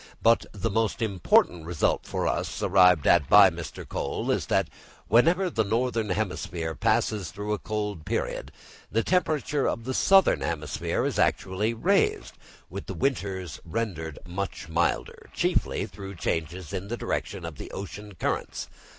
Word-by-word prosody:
But 115 Hz, +1 st, +4 dB
the 110 Hz, +2 st, -2 dB
most 110 Hz, +2 st, 0 dB
important 90 Hz, -4 st, +2 dB
result 85 Hz, -3 st, 0 dB
for -, -, -1 dB
us, -, -, -2 dB
arrived 90 Hz, -5 st, +5 dB
at 80 Hz, -6 st, +4 dB
by 100 Hz, -2 st, +8 dB
Mr. 85 Hz, -2 st, -7 dB
Croll, -, -, -2 dB
is -, -, -1 dB
that -, -, +2 dB, 0.4 s
whenever 170 Hz, -, +4 dB
the 115 Hz, -10 st, 0 dB
northern 115 Hz, 0 st, 0 dB
hemisphere 90 Hz, -4 st, -2 dB
passes 100 Hz, +2 st, 0 dB
through 105 Hz, +3 st, -4 dB
a 105 Hz, -, -2 dB
cold 105 Hz, -6 st, -3 dB
period -, -, -3 dB, 0.4 s
the 115 Hz, +1 st, +1 dB
temperature 155 Hz, -4 st, +1 dB
of 115 Hz, -, -2 dB
the 130 Hz, +3 st, -3 dB
southern 190 Hz, -, +5 dB
hemisphere 75 Hz, +1 st, -2 dB
is -, -, -1 dB
actually 105 Hz, +5 st, +1 dB
raised, 200 Hz, -, +1 dB, 0.3 s
with -, -, -7 dB
the -, -, -5 dB
winters 95 Hz, -, -2 dB
rendered 80 Hz, -5 st, -3 dB
much 95 Hz, -1 st, -5 dB
milder, 85 Hz, +1 st, -1 dB
chiefly -, -, 0 dB
through 95 Hz, -1 st, -9 dB
changes 85 Hz, +2 st, -3 dB
in 95 Hz, 0 st, -4 dB
the 120 Hz, +3 st, -3 dB
direction 95 Hz, -6 st, -3 dB
of 80 Hz, -4 st, -7 dB
the -, -, -7 dB
ocean 100 Hz, +2 st, -8 dB
currents. 80 Hz, -, -3 dB
100 Hz, 150 wpm, -27 LUFS, 85-115 Hz, 0.4 s, by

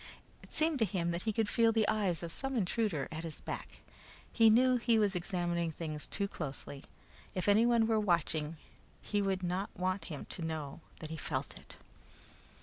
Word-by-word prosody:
It -, -, -15 dB
seemed 315 Hz, -2 st, +2 dB
to 225 Hz, -, +4 dB
him 175 Hz, -3 st, -1 dB
that 170 Hz, +1 st, -2 dB
he 220 Hz, -, 0 dB
could 220 Hz, 0 st, +1 dB
feel 230 Hz, +1 st, +4 dB
the 220 Hz, -2 st, +2 dB
eyes 195 Hz, -6 st, +1 dB
of 170 Hz, -, -4 dB
some 270 Hz, +6 st, -3 dB
intruder 200 Hz, -6 st, 0 dB
at 160 Hz, +1 st, -5 dB
his 165 Hz, -2 st, -6 dB
back. -, -, -7 dB, 0.5 s
He 225 Hz, -2 st, +6 dB
knew 250 Hz, +3 st, +5 dB
he 235 Hz, -1 st, +3 dB
was 205 Hz, -3 st, +2 dB
examining 175 Hz, -2 st, -1 dB
things 155 Hz, -1 st, -5 dB
too 200 Hz, -1 st, -1 dB
closely: 140 Hz, -4 st, -6 dB, 0.5 s
if 185 Hz, 0 st, -1 dB
anyone 225 Hz, +2 st, +5 dB
were 220 Hz, -1 st, +2 dB
watching, 165 Hz, -5 st, +1 dB, 0.4 s
he 205 Hz, -1 st, -1 dB
did 190 Hz, -2 st, 0 dB
not 180 Hz, +3 st, -1 dB
want 185 Hz, +2 st, -1 dB
him 150 Hz, -5 st, -6 dB
to -, -, -5 dB
know 160 Hz, -2 st, -4 dB, 0.2 s
that 155 Hz, -1 st, -6 dB
he 160 Hz, -, -4 dB
felt -, -, -3 dB
it. -, -, -12 dB
185 Hz, 185 wpm, -33 LUFS, 165-220 Hz, 0.5 s, He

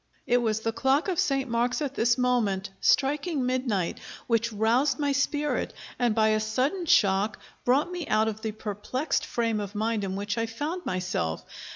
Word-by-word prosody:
It 245 Hz, -, +3 dB
was 220 Hz, -3 st, 0 dB
the 225 Hz, -, 0 dB
clock 265 Hz, -, +1 dB
of 360 Hz, -3 st, -1 dB
Saint 275 Hz, -7 st, +1 dB
Mark's 240 Hz, +1 st, 0 dB
at 285 Hz, -3 st, -2 dB
this 235 Hz, -1 st, +2 dB
moment 215 Hz, -7 st, +1 dB
striking 290 Hz, 0 st, +2 dB
midnight 250 Hz, -8 st, -1 dB, 0.3 s
which 230 Hz, 0 st, +1 dB
roused 230 Hz, +6 st, +2 dB
my 290 Hz, -2 st, 0 dB
spirit, 290 Hz, +2 st, 0 dB, 0.2 s
and 240 Hz, -3 st, +2 dB
by 220 Hz, -1 st, +4 dB
a 215 Hz, 0 st, +2 dB
sudden 260 Hz, -, -1 dB
shock 200 Hz, -3 st, +3 dB, 0.3 s
brought 280 Hz, +8 st, +3 dB
me 355 Hz, -4 st, -4 dB
out 215 Hz, +1 st, +2 dB
of 220 Hz, 0 st, -3 dB
the 220 Hz, -, -2 dB
perplexed 215 Hz, +7 st, -2 dB
frame 230 Hz, -2 st, 0 dB
of 205 Hz, 0 st, -5 dB
mind 220 Hz, 0 st, 0 dB
in 190 Hz, -1 st, -3 dB
which 205 Hz, +3 st, -2 dB
I 230 Hz, -, 0 dB
found 300 Hz, +10 st, -4 dB
myself. 180 Hz, -, -2 dB
235 Hz, 180 wpm, -27 LUFS, 215-275 Hz, 0.3 s, by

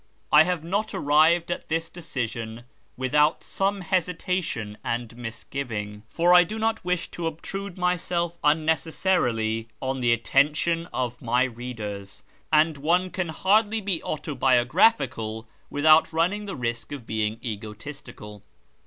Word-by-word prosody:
I 155 Hz, +1 st, +8 dB
have 180 Hz, -3 st, -1 dB
not 200 Hz, +6 st, -2 dB
arrived 160 Hz, +4 st, +3 dB
at -, -, -5 dB
this 165 Hz, +1 st, 0 dB
decision 120 Hz, -9 st, -5 dB, 0.3 s
without 150 Hz, +4 st, +2 dB
some 195 Hz, 0 st, -1 dB
hesitation 180 Hz, -, -2 dB
and 120 Hz, 0 st, -2 dB
misuivino 115 Hz, -2 st, -6 dB
for 175 Hz, +1 st, +3 dB
I 180 Hz, 0 st, +8 dB
do 215 Hz, +6 st, -6 dB
not 225 Hz, 0 st, -1 dB
wish 180 Hz, -1 st, -1 dB
to 170 Hz, -1 st, -3 dB
obtrude 190 Hz, +4 st, -6 dB
myself 175 Hz, -1 st, -1 dB
unnecessarily 150 Hz, -7 st, +1 dB
on 130 Hz, 0 st, -2 dB
the 120 Hz, -1 st, +3 dB
attention 150 Hz, +8 st, +2 dB
of 125 Hz, -5 st, -3 dB
my 120 Hz, +2 st, +2 dB
readers, 110 Hz, -5 st, -6 dB, 0.3 s
and 155 Hz, -1 st, +3 dB
one 175 Hz, +5 st, +1 dB
can 185 Hz, -3 st, -2 dB
hardly 210 Hz, +6 st, +2 dB
be 190 Hz, -5 st, -2 dB
autobiographical 125 Hz, -, +1 dB, 0.2 s
without 155 Hz, +2 st, +5 dB
running 180 Hz, +6 st, 0 dB
the 195 Hz, -, -5 dB
risk 115 Hz, 0 st, -3 dB
of 140 Hz, -5 st, -7 dB
being 110 Hz, 0 st, -1 dB
egotistical. 105 Hz, -1 st, -8 dB
150 Hz, 125 wpm, -25 LUFS, 120-175 Hz, 0.3 s, I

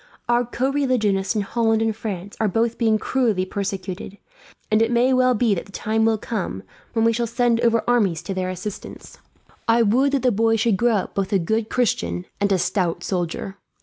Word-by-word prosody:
Our 240 Hz, 0 st, +2 dB
co 255 Hz, +3 st, -1 dB
religionists 230 Hz, -8 st, +1 dB
in 210 Hz, -, +1 dB
Holland 225 Hz, +1 st, +1 dB
and 225 Hz, -1 st, 0 dB
France 205 Hz, -3 st, -6 dB
are 220 Hz, -, +2 dB
both 225 Hz, +4 st, 0 dB
being 220 Hz, -2 st, +3 dB
cruelly 220 Hz, -6 st, 0 dB
persecuted, 195 Hz, 0 st, -5 dB, 0.5 s
and 215 Hz, +1 st, +4 dB
it 225 Hz, -, +3 dB
may 245 Hz, +2 st, +3 dB
well 255 Hz, -1 st, +3 dB
be 225 Hz, -1 st, +2 dB
that 180 Hz, -, -4 dB
the -, -, -15 dB
time 220 Hz, +2 st, 0 dB
will 225 Hz, -1 st, +2 dB
come 195 Hz, -, -4 dB, 0.3 s
when 225 Hz, -1 st, +2 dB
we 230 Hz, -, +4 dB
shall 235 Hz, +1 st, -1 dB
send 235 Hz, 0 st, +1 dB
over 230 Hz, -1 st, +2 dB
armies 205 Hz, -9 st, +2 dB
to 195 Hz, -, -4 dB
their 185 Hz, -1 st, -2 dB
assistance. 185 Hz, +3 st, -8 dB, 0.5 s
"I 230 Hz, +1 st, +4 dB
would 260 Hz, +6 st, +2 dB
that 275 Hz, -, +1 dB
the 250 Hz, -, +4 dB
boy 225 Hz, +1 st, +2 dB
should 225 Hz, -2 st, +1 dB
grow 240 Hz, 0 st, +2 dB
up 195 Hz, -, -2 dB
both 195 Hz, -1 st, -2 dB
a 200 Hz, -, +4 dB
good 220 Hz, +5 st, -1 dB
Christian 90 Hz, -, -1 dB
and 200 Hz, 0 st, +1 dB
a 190 Hz, -, +4 dB
stout 180 Hz, -1 st, -1 dB
soldier. 185 Hz, +1 st, -3 dB
220 Hz, 205 wpm, -22 LUFS, 195-235 Hz, 0.5 s, and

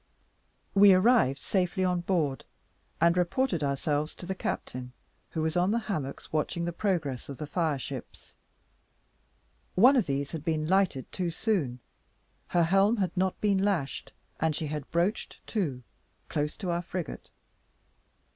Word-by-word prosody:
We 200 Hz, -1 st, +8 dB
arrived 185 Hz, -, +4 dB
safely 185 Hz, +4 st, 0 dB
on 180 Hz, -1 st, +1 dB
board, 165 Hz, -7 st, 0 dB, 0.6 s
and 170 Hz, +1 st, +4 dB
reported 180 Hz, -, +1 dB
ourselves 145 Hz, +2 st, -1 dB
to -, -, -8 dB
the 190 Hz, -, -2 dB
captain, 125 Hz, -8 st, -4 dB, 0.4 s
who 160 Hz, -, -2 dB
was 160 Hz, +1 st, -1 dB
on 180 Hz, +1 st, +3 dB
the 225 Hz, -, +2 dB
hammocks, 155 Hz, -, -4 dB
watching 165 Hz, +2 st, 0 dB
the 175 Hz, -, -2 dB
progress 160 Hz, -, -1 dB
of 140 Hz, -, -6 dB
the 150 Hz, -, -4 dB
fire 155 Hz, -1 st, 0 dB
ships. 130 Hz, -, -8 dB, 1.4 s
One 250 Hz, +9 st, +7 dB
of 240 Hz, -, +2 dB
these 140 Hz, 0 st, -1 dB
had 160 Hz, -3 st, -5 dB
been 155 Hz, -2 st, 0 dB
lighted 185 Hz, -7 st, +1 dB
too 180 Hz, -2 st, -2 dB
soon; 160 Hz, -, -1 dB, 0.7 s
her 175 Hz, -, +3 dB
helm 195 Hz, +6 st, +4 dB
had 190 Hz, -2 st, -1 dB
not 185 Hz, 0 st, 0 dB
been 200 Hz, -2 st, +3 dB
lashed, 190 Hz, -8 st, -1 dB, 0.3 s
and 160 Hz, -1 st, +1 dB
she 160 Hz, -, -3 dB
had 150 Hz, -1 st, -5 dB
broached 175 Hz, +6 st, -1 dB
to, 145 Hz, -, -2 dB, 0.5 s
close 150 Hz, 0 st, -2 dB
to 185 Hz, -4 st, -2 dB
our 170 Hz, 0 st, 0 dB
frigate. 175 Hz, -2 st, -6 dB
170 Hz, 150 wpm, -29 LUFS, 150-190 Hz, 1.4 s, We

